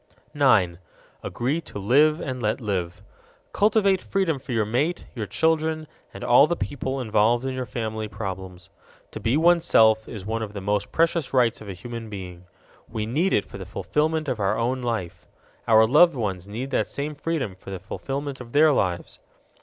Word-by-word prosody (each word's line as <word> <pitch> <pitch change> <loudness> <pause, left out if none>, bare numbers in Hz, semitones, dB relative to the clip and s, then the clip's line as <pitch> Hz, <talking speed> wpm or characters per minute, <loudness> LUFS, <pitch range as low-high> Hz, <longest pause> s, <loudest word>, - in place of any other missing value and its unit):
9. 105 - +3 0.4
Agree 140 +8 -2
to - - -10
live 145 +10 +3
and 130 -2 -4
let 110 -1 0
live. 90 -6 -3 0.5
Cultivate 200 -2 +3
freedom 180 -7 0
for 135 0 -9
your 110 -3 +1
mate, 140 +11 -1
your 110 -5 -4
children, 160 - 0 0.3
and - - -9
all 125 +4 +6
the 175 - 0
people 135 -3 -3
involved 115 +1 +2
in 130 - -2
your 130 -1 -4
family 110 0 -4
problems. 95 -3 -7 0.4
To - - -7
be 115 +5 +1
oneself 155 -10 +4
is 100 -5 -7
one 115 +1 -2
of 105 -2 -5
the 100 - -5
most 100 +1 -1
precious 165 -4 +1
rights 120 -4 +2
of 105 - -9
a - - -4
human 115 +4 -8
being. 90 -3 -8 0.4
We 110 -2 -3
need 155 - 0
it - - +2
for 100 - -10
the - - -5
fulfillment 155 +9 -1
of 130 -4 -2
our 100 -1 +1
own 125 +3 -1
life. 95 -8 -4 0.4
Our 110 0 +6
loved 155 +7 +5
ones 100 -6 -3
need 120 +7 -5
that - - +1
same 145 +2 -4
freedom 145 - -3
for 95 - -13
the 95 - -4
fulfillment 135 +8 -5
of 120 -1 -11
their 155 +2 +6
lives. 90 -10 -1
120 Hz, 185 wpm, -24 LUFS, 105-145 Hz, 0.5 s, all